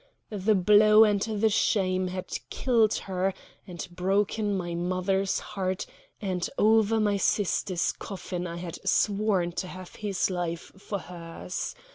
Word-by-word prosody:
The 210 +1 +2
blow 210 +3 +6
and 205 -2 +2
the 220 0 +1
shame 185 -3 +1
had 185 0 -5
killed 230 -4 +2
her 190 0 -2 0.3
and 175 0 -6
broken 200 +3 0
my 175 -2 -3
mother's 185 +3 0
heart; 190 -3 -3 0.3
and 185 -4 -2
over 220 +1 +4
my 205 -2 +2
sister's 190 -2 +1
coffin 180 -3 -6
I 170 0 -6
had 170 -1 -6
sworn 200 -4 +2
to 185 +2 -4
have 185 0 -10
his 200 -2 -1
life 175 -2 -3
for 200 +1 -5
hers. 175 0 -6
190 Hz, 135 wpm, -27 LUFS, 180-210 Hz, 0.3 s, blow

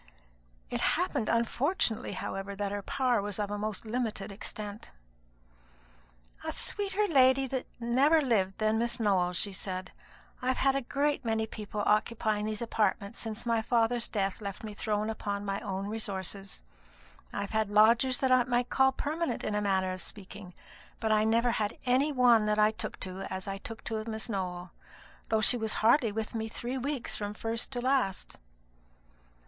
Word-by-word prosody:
It - - -1
happened 215 - +1
unfortunately, 235 - 0
however, 195 +1 -4
that 200 0 -2
her 205 0 -3
power 250 0 +1
was 205 -1 -3
of 205 -1 -2
a 205 - -2
most 215 0 -3
limited 220 -3 -2
extent. 205 +1 -6 1.5
"A - - -2
sweeter 405 0 -1
young 405 - -1
lady 265 0 +5 0.3
never 265 +7 +4
lived 210 -9 +1
than 215 0 +1
Miss 235 +1 0
Nowell," 190 -5 +2
she 195 +3 0
said. 185 -1 -4 0.5
"I've 255 0 0
had 270 0 +3
a 275 - +1
great 285 +3 0
many 220 -1 0
people 210 -1 -5
occupying 215 0 +1
these 215 +1 -3
apartments 210 -1 -1
since 225 0 -4
my 230 -1 +2
father's 235 +1 +1
death 195 -1 -2
left 200 0 -6
me 215 -1 -6
thrown 210 0 -1
upon 205 -2 -3
my 195 0 -2
own 195 -1 -4
resources. 195 - -5 0.7
I've 200 -1 -4
had 220 -2 +1
lodgers 230 +5 +5
that 265 -1 +2
I 255 -1 +6
might 245 0 0
call 265 0 +4
permanent, 315 +5 -2
in 215 - -2
a 210 - 0
manner 190 -2 +1
of 185 - -6
speaking; 195 -2 -9 0.4
but 220 -1 0
I 215 0 +4
never 230 +2 +3
had 215 -2 -2
any 260 +4 +3
one 245 -5 +5
that 210 0 +1
I 215 0 +5
took 220 - -5
to 185 0 -5
as 190 0 -5
I 195 0 -4
took 225 +2 -8
to 220 -1 -3
Miss 220 +1 -4
Nowell, 180 -3 -4 0.6
though 220 -1 +2
she 245 +3 +9
was 220 -2 0
hardly 235 -1 +5
with 220 +1 -4
me 220 -1 -2
three 245 +3 -4
weeks 275 0 -2
from 205 0 -4
first 225 +1 -2
to 245 - -2
last." 255 -7 0
220 Hz, 175 wpm, -30 LUFS, 205-245 Hz, 1.5 s, she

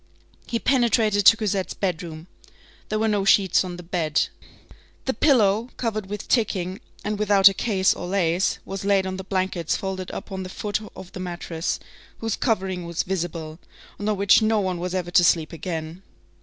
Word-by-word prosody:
He 235 - -1
penetrated 230 -5 +3
to 225 - +9
Cosette's 200 -3 -1
bedroom. 170 -4 -3 0.6
There 215 - 0
were 220 +1 +1
no 205 -2 +1
sheets 195 -1 +4
on 180 -1 -6
the 175 - -9
bed. 165 -3 0 0.8
The 265 - 0
pillow, 225 -4 +3
covered 215 -4 -2
with 205 +1 -6
ticking, 195 -3 0 0.2
and 210 0 -2
without 205 -2 +6
a 195 - +6
case 190 -2 +2
or 175 - -6
lace, 180 -1 +1
was 195 0 -5
laid 195 -1 +2
on 185 0 -3
the 190 - -6
blankets 185 -3 -1
folded 190 -1 -4
up - - -7
on 190 0 -4
the 185 - -6
foot 205 +2 -2 0.2
of 185 - -10
the - - -8
mattress, 175 -2 -3 0.4
whose 225 -1 -2
covering 190 -6 -1
was 170 -1 -1
visible, 165 -3 -4 0.4
and 205 +1 -1
on 210 - 0
which 200 +3 +5
no 220 0 +2
one 185 -3 -1
was 180 +1 -3
ever 175 -2 -2
to 180 - +5
sleep 165 -2 +2
again. 165 0 -5
190 Hz, 185 wpm, -24 LUFS, 175-210 Hz, 0.8 s, to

